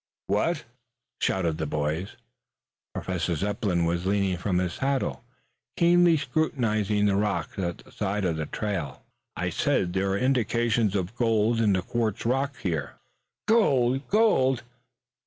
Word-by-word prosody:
"What?" 150 - 0 0.5
shouted 85 -4 0
the 80 - -1
boys. 75 +6 -2 0.8
Professor 90 -2 -2
Zepplin 95 -1 0
was 85 +2 -1
leaning 100 -2 +1
from 90 +1 -1
his 90 -1 0
saddle, 135 -3 -1 0.5
keenly 175 -1 +5
scrutinizing 115 -8 0
the 100 -1 +3
rocks 100 -4 -1
at 85 -2 -2
the - - -17
side 100 0 -2
of 85 -3 0
the 80 -1 -3
trail. 95 -10 -4 0.3
"I - - -2
said, 90 -1 0
there 95 +1 0
are - - +1
indications 120 -4 +1
of 95 +3 -2
gold 115 -1 +2
in 105 -3 +3
the 95 -1 0
quartz 115 -1 -2
rock 135 +4 0
here 80 -6 -3 0.3
" - - -57
"Gold! 135 - +3
Gold! 135 - +3
105 Hz, 140 wpm, -26 LUFS, 90-125 Hz, 0.8 s, keenly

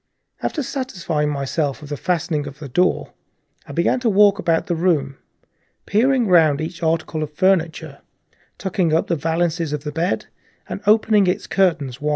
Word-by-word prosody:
After 300 - -2
satisfying 180 - -2
myself 145 +1 -2
of 145 - -10
the 145 - -3
fastening 160 -3 -1
of 140 0 -9
the 150 -1 -8
door, 180 +8 0 0.5
I - - -8
began 170 - +1
to 245 -2 +1
walk 205 0 +4
round 165 -1 +2
the 175 - -1
room, 155 -6 0 0.7
peering 245 +4 +2
round 160 -7 +4
each 165 +2 -5
article 160 -1 -1
of 155 -1 -4
furniture, 165 -6 0 0.6
tucking 190 -4 0
up 165 - +2
the 170 - 0
valances 165 0 -1
of 150 -1 -4
the 150 - -4
bed 165 +5 -1 0.4
and - - -6
opening 215 -2 +4
its 180 - 0
curtains 155 -9 0
wide. 150 - -1
165 Hz, 170 wpm, -21 LUFS, 150-185 Hz, 0.7 s, walk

